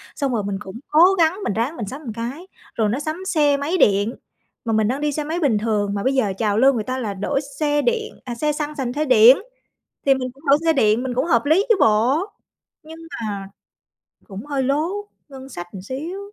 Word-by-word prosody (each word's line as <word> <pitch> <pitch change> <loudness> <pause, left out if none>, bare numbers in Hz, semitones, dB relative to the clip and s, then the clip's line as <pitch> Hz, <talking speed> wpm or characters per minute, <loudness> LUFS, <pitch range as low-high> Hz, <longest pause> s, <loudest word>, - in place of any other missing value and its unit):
xong 275 -4 -1
rồi 215 -3 -1
mình 200 -1 -3
cũng 210 +3 -9
cố 350 +5 +5
gắng 335 +4 +2
mình - - -1
ráng 240 +9 -1
mình 210 - -4
sắm 275 +7 -7
một 230 -7 -6
cái. 255 - -6 0.3
Rồi 215 -2 +1
nó 245 +6 -1
sắm 315 +5 -5
xe 295 -6 +2
máy 310 +6 -1
điện, 205 - +3 0.5
mà 225 - 0
mình 215 -1 +2
đang 265 +5 -2
đi 300 -1 0
xe 300 +1 -3
máy 325 +4 -3
bình 265 -10 +2
thường, 205 -2 -1
mà 200 - -3
bây 265 - +1
giờ 215 -8 +1
trào 210 -2 0
lưu 270 +3 +5
người 220 -3 -2
ta 255 +3 -3
là 210 -5 -3
đổi 275 +9 -1 0.2
xe 295 -1 +1
điện 455 +1 -1
à, 240 -2 -5
xe 300 +4 0
xăng 295 0 -4
sành 250 -4 -3
the 305 +1 -1
điện, 250 -1 +7 0.7
thì 275 - +6
mình 255 -1 -3
cũng 275 +4 -21
đổi 280 +1 +5
xe 325 - +4
điện, 220 -4 +2
mình 255 -1 -3
cũng 260 +4 +1
hợp 235 -6 +2
lý 335 +7 +4
chứ 455 - +6
bộ. 225 +7 +3 0.6
Nhưng 320 +1 -11 0.3
mà 195 -1 -5 0.8
cũng 200 +7 -8
hơi 280 -2 -1
lố 290 +5 +1 0.4
ngân 265 -1 -11
sách 175 -8 -7
một 190 -2 -8
xíu. 305 - -5
265 Hz, 235 wpm, -21 LUFS, 220-300 Hz, 0.8 s, điện